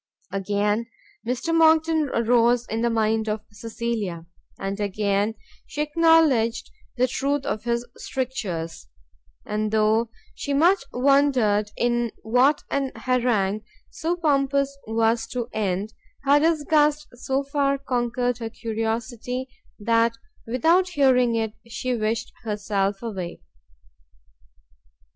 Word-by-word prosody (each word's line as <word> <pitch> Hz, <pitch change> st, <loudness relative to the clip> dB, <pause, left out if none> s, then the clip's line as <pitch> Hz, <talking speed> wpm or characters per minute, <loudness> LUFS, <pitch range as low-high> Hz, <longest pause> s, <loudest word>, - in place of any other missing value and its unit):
Again 205 Hz, +3 st, 0 dB, 0.4 s
Mr 255 Hz, +7 st, -1 dB
Monckton 320 Hz, -2 st, +4 dB
arose 235 Hz, +1 st, +3 dB
in 225 Hz, 0 st, -3 dB
the 235 Hz, -, +2 dB
mind 220 Hz, -1 st, +1 dB
of 210 Hz, 0 st, -2 dB
Cecilia, 215 Hz, -5 st, -4 dB, 0.3 s
and 195 Hz, +1 st, -4 dB
again 205 Hz, +1 st, 0 dB, 0.3 s
she 295 Hz, -, -2 dB
acknowledged 300 Hz, -7 st, +3 dB, 0.3 s
the 250 Hz, +1 st, +3 dB
truth 280 Hz, +2 st, -1 dB
of 215 Hz, -, -3 dB
his 235 Hz, 0 st, 0 dB
strictures; 185 Hz, -, -4 dB, 0.6 s
and 215 Hz, 0 st, -1 dB
though 220 Hz, +1 st, +2 dB, 0.2 s
she 280 Hz, -, -3 dB
much 350 Hz, +5 st, +4 dB
wondered 250 Hz, -6 st, +3 dB
in 240 Hz, -1 st, +1 dB
what 250 Hz, +6 st, +3 dB
an 275 Hz, -2 st, 0 dB
harangue 235 Hz, -6 st, +1 dB, 0.3 s
so 335 Hz, +2 st, -2 dB
pompous 280 Hz, -4 st, +1 dB
was 225 Hz, +1 st, +1 dB
to 245 Hz, -2 st, -4 dB
end, 205 Hz, 0 st, -2 dB, 0.3 s
her 285 Hz, +1 st, +5 dB
disgust 300 Hz, -1 st, +2 dB
so 265 Hz, +3 st, -2 dB
far 275 Hz, 0 st, 0 dB
conquered 245 Hz, -2 st, -1 dB
her 225 Hz, -1 st, -4 dB
curiosity, 230 Hz, +3 st, -3 dB, 0.3 s
that 230 Hz, +1 st, +2 dB, 0.3 s
without 330 Hz, +10 st, +3 dB
hearing 255 Hz, -7 st, +3 dB
it, 220 Hz, -1 st, -1 dB
she 250 Hz, +2 st, -3 dB
wished 220 Hz, 0 st, -2 dB
herself 205 Hz, -1 st, -1 dB
away. 190 Hz, -6 st, -5 dB
235 Hz, 110 wpm, -24 LUFS, 215-275 Hz, 0.6 s, her